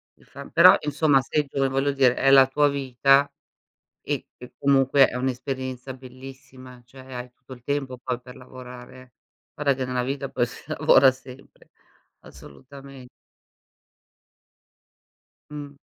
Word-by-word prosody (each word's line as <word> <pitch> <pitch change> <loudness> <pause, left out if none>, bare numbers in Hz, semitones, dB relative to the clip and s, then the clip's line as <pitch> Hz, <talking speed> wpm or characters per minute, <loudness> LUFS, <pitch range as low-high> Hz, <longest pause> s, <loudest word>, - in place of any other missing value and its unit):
di - - -26
fa 140 +1 -12
però 180 +2 +7
insomma 150 -1 +2
sei 150 +2 -2
gio 135 0 -1
voglio 135 +2 0
dire, 130 -3 +3
è 135 - +1
la 135 -1 +7
tua 145 +2 +1
vita 135 +1 +2 0.7
e - - -4
che, 125 - -13
comunque, 135 0 +3
è - - -8
un'esperienza 130 0 -5
bellissima, 130 -1 -14
cioè 130 +2 -17 0.2
hai 125 0 -8
tutto 130 - -15
il 120 -1 -16
tempo 135 -2 -3
poi 125 -1 -5
per 125 +1 -14
lavorare 125 0 -12
eh. 130 -1 -19 0.4
Guarda 145 -2 0
che, 130 -1 -4
nella 125 -1 -2
vita 135 +1 -4
poi 120 -1 -1
si 120 - -12 0.2
lavora 135 -1 +5
sempre, 130 0 -16 0.5
assolutame 135 - -14 2.4
Mh. 145 -1 -9
130 Hz, 140 wpm, -23 LUFS, 125-140 Hz, 2.4 s, però